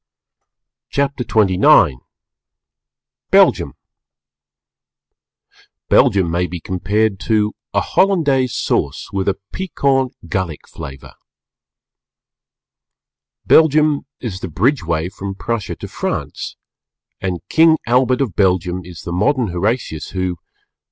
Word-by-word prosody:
CHAPTER 140 -2 -1
XXIX 95 - +4 1.3
BELGIUM - - +4 2.2
Belgium 95 -4 +4
may 90 +1 0
be 90 0 -6
compared 95 +4 -1
to 105 0 +1 0.2
a - - +1
Hollandaise 145 -10 +2
Sauce - - -1
with 95 -1 -1
a 100 - +2 0.2
piquant 140 -8 0
Gallic 85 -3 -3
flavour. 70 -5 -10 2.3
Belgium 155 -2 +4
is 105 -7 -5
the - - -5
Bridgeway 85 - 0
from 100 -1 -6
Prussia 115 +1 -3
to - - -8
France, - - -4 0.7
and 90 -3 -4
King 160 0 +5
Albert 125 +2 +2
of 115 -11 -2
Belgium 90 -2 +1
is 85 -2 -11
the 85 - -5
modern 120 +5 +1
Horatius 90 - -2
who 95 -1 -2
_" - - -27
100 Hz, 100 wpm, -18 LUFS, 90-130 Hz, 2.3 s, King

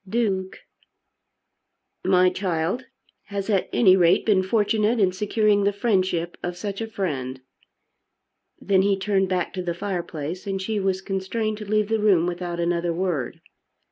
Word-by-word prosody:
"Duke!" 195 -4 -1 1.4
"My 185 -1 +4
child 180 +5 -2 0.4
has 200 +1 -3
at 195 -3 +1
any 190 -5 +5
rate 175 -2 +4
been 205 -4 +4
fortunate 215 +3 +1
in 190 -3 +3
securing 210 +1 +1
the 200 - +3
friendship 185 -5 0
of 175 0 -4
such 200 +2 -4
a 225 - -2
friend." 140 -12 -3 1.2
Then 195 -2 +2
he 195 0 +2
turned 195 -1 +1
back 180 -2 -1
to 185 - -3
the 175 -1 -3
fireplace, 175 -2 -4
and 195 -1 -2
she 210 +2 -2
was 190 -1 0
constrained 210 +3 -2
to 210 -2 -8
leave 215 -1 +2
the 225 0 +1
room 195 -6 +4
without 175 -1 -3
another 170 0 0
word. 165 -7 -2
190 Hz, 150 wpm, -24 LUFS, 180-210 Hz, 1.4 s, any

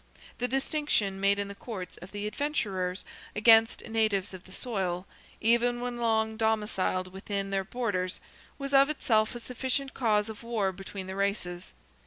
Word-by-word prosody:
The 245 - +1
distinction 270 -7 0
made 200 +1 +3
in 200 0 -1
the 200 - -6
courts 200 -3 -7
of 180 +3 -11
the 205 0 -4
adventurers 205 -8 -1 0.3
against 225 +2 +5
natives 215 -4 +1
of 185 -1 -9
the 185 - -15
soil, 190 -5 -2 0.3
even 235 +2 +3
when 245 0 -3
long 220 -2 +1
domiciled 210 -4 0
within 195 0 -3
their 195 -1 +1
borders, 195 -4 -2 0.4
was 275 0 -5
of 275 +1 +7
itself 225 -6 +2
a - - -4
sufficient 260 +3 -1
cause 210 -4 +2
of 220 -1 -8
war 225 -5 0
between 195 +1 -7
the 190 0 -5
races. 195 -3 -2
215 Hz, 160 wpm, -29 LUFS, 195-240 Hz, 0.4 s, of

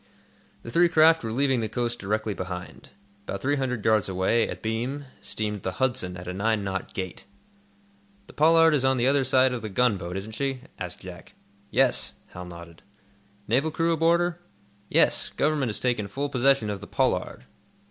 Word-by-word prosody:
The 115 - -7
three 175 +4 +4
craft 160 -1 +5
were 110 - -3
leaving 135 +1 +1
the 110 -1 -2
coast 120 +1 -2
directly 105 +2 -1
behind. 90 -2 -7 0.4
About 100 - -4
three 145 +2 0
hundred 125 -5 -2
yards 110 -3 +3
away, 95 +5 +1
abeam, 120 +6 -3 0.2
steamed 105 -2 -3
the 95 - -3
"Hudson" 120 -6 -1
at 90 - -9
a 90 - -3
nine 105 +2 0
knot 95 -1 -4
gait. 95 -1 -5 1.0
"The - - -15
'Pollard' 165 +1 +5
is 140 -3 +1
on 130 0 +3
the 120 - +1
other 140 +1 +3
side 130 0 +3
of 120 - -4
the 110 - -5
gunboat, 95 -5 0
isn't 100 +3 -6
she?" 135 +2 -3 0.2
asked - - -6
Jack. - - -11 0.4
"Yes," - - +2 0.2
Hal 90 0 -9
nodded. 85 -1 -11 0.7
"Naval 130 +8 +2
crew 165 +1 +1
aboard 165 +2 +3
her?" 175 -1 -2 0.5
"Yes; - - +4
Government 145 -4 0
has 105 - -4
taken 120 -5 0
full 140 +8 -3
possession 130 -4 +2
of 100 -1 -5
the 100 - -9
'Pollard. - - -1
120 Hz, 180 wpm, -26 LUFS, 100-140 Hz, 1.0 s, craft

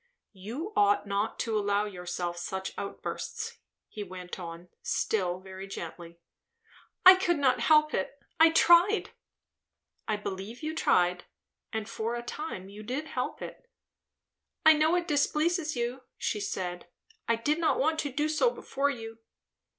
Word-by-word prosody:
"You 240 - -6
ought 205 0 +4
not 200 +1 -1
to 225 -2 -1
allow 205 0 +1
yourself 180 -3 -4
such 190 +2 -4
outbursts," 455 - -5 0.3
he 210 - -6
went 185 -1 -8
on, 170 0 -8
still 185 -4 0
very 190 +1 -9
gently. 170 -2 -8 0.9
"I 370 - +13
could 360 -3 +1
not 255 -3 +3
help 305 +4 +4
it. 190 +8 -2 0.2
I 325 0 +8
tried 345 +5 +5 0.5
" - - -51
"I 215 - +1
believe 205 +5 -6
you 310 +1 -2
tried; 180 - +2 0.5
and 220 -1 -3
for 230 +1 -3
a 240 - -4
time 240 - -6
you 205 +2 -10
did 265 +8 -4
help 250 - -3
it." - - -10 1.0
"I 315 - +10
know 310 +2 +3
it 350 -1 0
displeases 310 +2 +1
you," 240 +2 -2 0.2
she 210 - -1
said. 180 -3 -4 0.4
"I 230 - +3
did 295 +8 0
not 330 - +2
want 315 +3 +2
to 290 - -2
do 295 +4 0
so 310 +10 +3
before 285 - -1
you." 225 -4 -6
230 Hz, 150 wpm, -29 LUFS, 190-310 Hz, 1.0 s, I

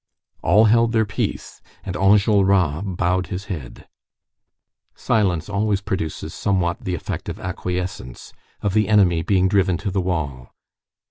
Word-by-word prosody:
All 110 +2 +4
held 115 +1 +3
their 110 -1 +3
peace, 100 - -4 0.2
and 95 - -5
Enjolras 95 -5 +3 0.2
bowed 90 +1 0
his 95 0 -5
head. 70 -8 -9 1.1
Silence 90 -7 0
always 100 -1 0
produces 95 -6 -4
somewhat 90 -3 -1
the 90 - -1
effect - - -5
of - - -6
acquiescence, 90 -7 -5 0.3
of 100 - 0
the 110 +1 +2
enemy 95 -6 +4
being 95 +1 +2
driven 95 -2 +2
to 100 - -4
the 95 0 0
wall. 75 -8 -3
95 Hz, 135 wpm, -21 LUFS, 90-100 Hz, 1.1 s, All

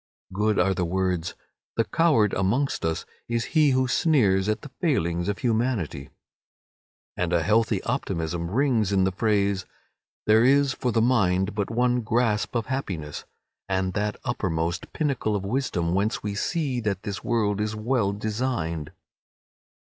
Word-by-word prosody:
Good 105 +1 +1
are 95 +2 +3
the 90 -1 -1
words 90 -1 -1 0.4
"The 115 - +4
coward 145 - +2
amongst 115 +9 0
us 80 -1 -1 0.2
is 115 -1 -1
he 155 -3 +5
who 130 -1 +2
sneers 110 - +3
at 110 - 0
the 145 - -9
failings 85 - 0
of 100 - -1
humanity," 110 - -1 1.1
and 90 -1 -1
a 85 -2 +2
healthy 110 +5 +2
optimism 85 +1 -2
rings 115 -3 +1
in 95 -1 +3
the 95 - +2
phrase 100 -1 0 0.6
"There 110 +1 +5
is 140 +1 +4
for 125 - -1
the 115 0 +2
mind 95 -5 +2
but 100 -1 -2
one 125 +1 +1
grasp 110 -1 0
of 115 -2 0
happiness; 90 - -4 0.4
from 95 -1 0
that 105 +1 -2
uppermost 85 -7 -2
pinnacle 135 -8 -1
of 100 -1 -3
wisdom 95 -8 -1
whence 100 +5 0
we 105 -1 -2
see 135 - -1
that 100 -4 -2
this 100 -2 -5
world 105 -4 0
is 105 0 -2
well 110 -2 0
designed." 105 - -2
105 Hz, 150 wpm, -25 LUFS, 95-125 Hz, 1.1 s, he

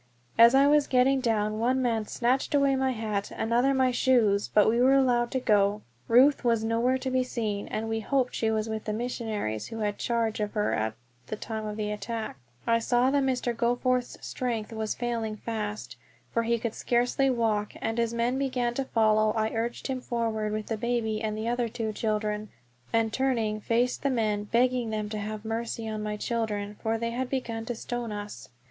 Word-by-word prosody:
As 235 +2 +7
I 275 +1 +6
was 295 0 +4
getting 260 +1 +3
down 215 -3 0
one 250 +3 +2
man 230 -4 0
snatched 260 +5 0
away 280 -1 +4
my 265 0 +1
hat, 215 -4 -2
another 240 +4 +1
my 260 -1 +3
shoes; 230 -6 +3
but 210 - +4
we 235 +2 +3
were 265 +2 +5
allowed 245 -3 +3
to 260 - -1
go. 205 -3 +2 0.2
Ruth 260 +5 +5
was 230 -2 +2
nowhere 230 +3 +2
to 260 0 -4
be 255 0 +2
seen, 215 -5 -3
and 220 +1 -3
we 225 0 -1
hoped 255 +3 0
she 225 - 0
was 220 0 0
with 220 -1 -4
the 215 - -2
missionaries 220 - -3
who 225 -1 -6
had 205 -1 -1
charge 230 -2 0
of 210 -1 -2
her 210 -2 0
at 110 0 -1 0.3
the - - -3
time 215 0 -5
of 210 0 -5
attack. 210 0 -4 0.3
I 230 0 +3
saw 245 +3 +2
that 285 0 +3
Mr. 250 -3 0
Goforth's 245 +1 0
strength 230 -3 -3
was 220 -1 -2
failing 230 -3 -2
fast, 215 - -5 0.4
for 230 - +2
he 235 +1 +1
could 230 -1 -3
scarcely 245 +3 +1
walk, 220 -4 0
and 225 +1 -2
as 230 -1 +1
men 235 +3 0
began 255 -3 0
to 270 +2 -2
follow 215 -2 +3
I 220 0 0
urged 235 +1 -3
him 260 -2 -2
forward 225 -3 -2
with 215 0 -3
the 225 - -3
baby 220 -1 -1
and 215 -1 -2
the 220 +1 -3
other 240 0 0
two 220 -2 -3
children, 210 -1 -2 0.4
and 225 -1 +1
turning 230 -5 0
faced 240 +3 +1
the 280 - +1
men, 215 -5 0
begging 245 +1 +1
them 215 -1 -3
to 215 0 -4
have 215 +1 -5
mercy 225 0 -3
on 215 -1 -3
my 210 0 -3
children, 210 -3 -2
for 225 0 0
they 230 +1 -2
had 250 +2 -3
begun 230 -4 -3
to 240 - -3
stone 240 0 -4
us. 205 - -7
230 Hz, 200 wpm, -28 LUFS, 215-245 Hz, 0.4 s, As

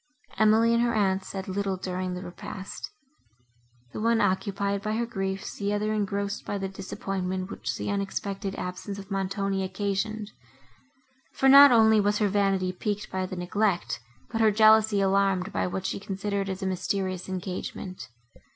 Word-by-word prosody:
Emily 220 +2 +5
and 235 - +3
her 235 -1 +1
aunt 195 -2 +2
said 190 0 -6
little 195 0 -1
during 185 0 -3
the 180 - -6
repast; 190 +2 -7 1.0
the - - -4
one 230 0 +3
occupied 200 0 0
by 215 +1 -2
her 235 +2 0
griefs, 195 -3 -4
the 200 0 -1
other 210 +1 0
engrossed 200 -1 -2
by 205 - -3
the 195 -1 -2
disappointment, 190 -1 -4
which - - -4
the - - -3
unexpected 195 0 -3
absence 180 +2 -5
of 195 0 -10
Montoni 195 0 -1
occasioned; 205 +3 -2 1.0
for 270 - +2
not 280 +1 +10
only 220 -2 +6
was 205 +1 +2
her 210 -1 +2
vanity 195 -2 +1
piqued 205 +2 -3
by 185 0 -2
the 185 - -6
neglect, 180 -1 0 0.3
but 225 -1 -1
her 220 - +6
jealousy 215 -1 +5
alarmed 195 0 +2
by - - 0
what 185 +1 -4
she - - -2
considered 195 0 -3
as 190 +1 -4
a - - -1
mysterious 185 0 -2
engagement. 185 0 -5
195 Hz, 160 wpm, -27 LUFS, 190-210 Hz, 1.0 s, not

